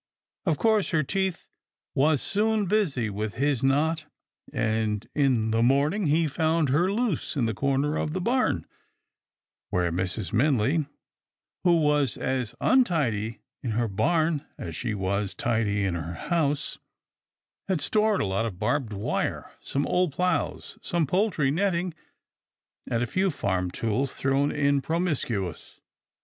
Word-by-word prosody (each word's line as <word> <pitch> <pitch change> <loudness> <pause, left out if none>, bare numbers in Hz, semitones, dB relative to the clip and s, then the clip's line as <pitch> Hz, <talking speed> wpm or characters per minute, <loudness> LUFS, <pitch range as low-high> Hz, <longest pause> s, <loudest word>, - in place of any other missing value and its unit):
Of 160 -4 +2
course, 220 0 +2
her 155 -3 +2
teeth 190 +3 -2 0.5
was 145 +1 +3
soon 215 +1 +1
busy 175 - +1
with 105 +1 -3
his 140 -2 0
knot, 155 +4 +2 0.5
and 110 -1 -1
in 125 -6 +2
the 115 +1 +2
morn 140 +6 +3
ing 205 -4 -1
he 160 +3 +3
found 160 0 +1
her 175 +8 +2
loose 225 -4 -1
in 125 -5 +1
a 110 - -1
corner 140 +6 0
of 150 - -2
the 185 - -1
barn, 235 - +1 1.0
where 90 -1 +1
Mrs. 90 +1 -2
Minley, 140 +4 +2 0.8
who 170 -2 +4
was 150 -2 +2
as 130 -4 -2
untidy 140 - +1 0.2
in 120 -4 -2
her 120 +1 +1
barn 155 - +1
as 80 -1 -6
she 115 -4 -2
was 95 0 -1
tidy 105 -2 0
in 95 - 0
her 85 0 -4
house, 150 - -1 0.9
had 190 -4 +1
stored 215 +3 +2
a - - +1
lot 100 +4 0
of 95 -6 -7
barbed 130 0 -1
wire, 100 +1 -2
some 140 +1 -2
old 180 -5 +1
ploughs, 180 +2 -1
some 170 -2 0
poultry 180 -4 +1
net 190 +5 +1
ting, 175 0 -2 1.0
and 115 0 +1
a - - +1
few 190 +10 +1
farm 95 - -1
tools 115 +8 -1
thrown 140 +1 +1
in 140 -1 +2
promiscuous. 135 - -2
140 Hz, 145 wpm, -26 LUFS, 110-170 Hz, 1.0 s, who